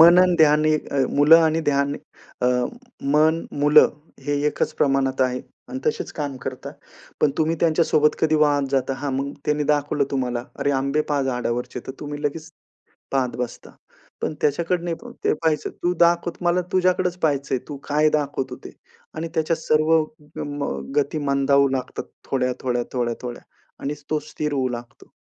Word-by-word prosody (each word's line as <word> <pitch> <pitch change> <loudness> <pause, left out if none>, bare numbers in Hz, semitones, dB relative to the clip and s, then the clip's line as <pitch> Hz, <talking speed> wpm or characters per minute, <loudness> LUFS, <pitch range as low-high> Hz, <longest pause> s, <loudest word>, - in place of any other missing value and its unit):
मन 170 +2 +9
अन 180 -1 +3
ध्यान 155 -1 +5
ए 155 0 +3 0.4
मुलं 150 +3 +8
आणि 160 0 +2
ध्यान 140 0 +1 0.5
अ, - - +4 0.7
मन, 160 +2 +3 0.2
मुलं 150 +1 +7 0.4
हे 145 - +1
एकच 150 - 0
प्रमाणात 135 -1 +2
आहे 125 0 0 0.3
आणि 130 - -4
तसेच 155 - -1
काम 145 -3 -4
करतात. 130 -1 -6 0.5
पण 150 - +4
तुम्ही 160 +1 +2
त्यांच्यासोबत 155 -2 +3
कधी 155 -1 +3
वाहत 145 -2 +3
जाता. 135 0 +1
हां. 140 +1 -3
मग 140 +1 -2
त्यांनी 150 0 +1
दाखवलं 145 0 +1
तुम्हाला, 125 -3 -1 0.2
"अरे, 145 - +2
आंबे 140 +2 +1
पहा 145 -1 +2
झाडावरचे" 125 -1 -2
तर 130 - -5
तुम्ही 145 0 -6
लगेच 155 +2 -3 0.6
पाहत 130 -2 0
बसता. 125 -1 -5 0.5
पण - - -1
त्याच्याकडं 170 +4 +1
नाही 170 -1 -1 0.3
ते - - +3
पाहायचं. 155 0 0
"तू 175 +1 +2
दाखवत 170 +1 0
मला 175 +1 +2
तुझ्याकडेच 180 -1 +2
पहायचंय. 140 -5 0
तू 145 - -5
काय 150 +1 +4
दाखवतो 145 -3 -1
ते" - - -8 0.4
आणि 160 +1 -3
त्याच्या 160 0 +1
सर्व 155 0 +2 0.4
ग - - -4 0.2
म 145 - -2 0.3
गती 145 +2 +1
मंदावू 140 0 +4
लागतात 130 -1 -4 0.3
थोड्या, 125 -2 +1
थोड्या, 120 -2 0
थोड्या, 120 -2 0
थोड्या 120 -1 -6 0.4
आणि 140 - -1 0.2
तो 155 - +1
स्थिर 150 -1 -3
होऊ 130 -2 0
लागतो. 120 0 -14
145 Hz, 165 wpm, -23 LUFS, 135-155 Hz, 0.7 s, मन